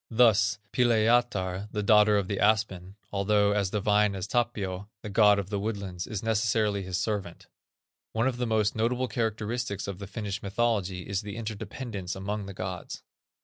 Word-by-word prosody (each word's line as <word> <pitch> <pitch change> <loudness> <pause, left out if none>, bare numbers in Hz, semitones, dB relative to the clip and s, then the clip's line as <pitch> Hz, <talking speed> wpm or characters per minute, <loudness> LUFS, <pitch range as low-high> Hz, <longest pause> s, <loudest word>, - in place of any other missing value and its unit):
Thus, 110 -4 +4 0.2
Pilajatar, 110 -5 +2
the 105 - -2
daughter 105 0 +5
of 100 -2 0
the 100 -1 -2
aspen, 100 -3 +1 0.2
although 100 +1 +3
as 100 -2 +1
divine 105 0 +2
as 95 - -3
Tapio, 105 -4 -2
the 105 - -6
god 105 0 +6
of 100 0 -4
the 100 - -1
woodlands, 100 -4 -4
is 105 -2 -4
necessarily 110 -2 +1
his 95 -1 -3
servant. 100 -6 -3 0.7
One 115 +2 0
of 130 -2 -1
the 125 -1 -1
most 110 -2 +1
notable 125 +3 0
characteristics 110 -2 -2
of 100 -2 -5
the 100 - -7
Finnish 105 -1 -4
mythology 100 -3 -1
is 100 -2 -1
the 105 0 -7
interdependence 110 -3 -5
among 100 +1 -4
the 100 - -8
gods. 95 -2 -6
105 Hz, 165 wpm, -28 LUFS, 100-110 Hz, 0.7 s, god